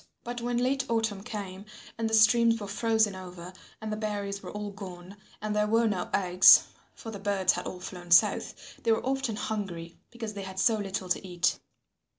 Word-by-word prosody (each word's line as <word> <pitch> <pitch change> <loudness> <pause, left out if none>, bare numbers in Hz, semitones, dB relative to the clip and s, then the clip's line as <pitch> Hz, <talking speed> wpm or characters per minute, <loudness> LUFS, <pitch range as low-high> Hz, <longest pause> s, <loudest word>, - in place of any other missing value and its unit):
But 240 0 -5
when 240 0 -1
late 265 +2 +1
autumn 225 -4 0
came 195 -3 -7 0.3
and 225 0 -2
the 225 - +2
streams 230 +1 +5
were 205 - -5
frozen 220 0 +1
over 180 -1 -9 0.3
and 215 0 -4
the - - -3
berries 205 -2 -3
were - - -8
all 210 0 -5
gone 185 -1 -10 0.3
and 210 0 -2
there 210 0 +2
were 225 +2 +3
no 190 -4 -2
eggs, 180 -2 +7 0.3
for 225 - -8
the 205 - -7
birds 200 -2 +1
had - - -5
all 180 - -6
flown 180 -1 -9
south, 170 - +2
they 230 - +1
were 220 - +1
often 265 -4 -1
hungry 185 -6 -5
because 225 -3 -6
they 200 - -6
had 190 -1 -8
so 220 +4 +3
little 195 -2 -4
to 180 - 0
eat. 180 -2 0
205 Hz, 195 wpm, -28 LUFS, 190-225 Hz, 0.3 s, eggs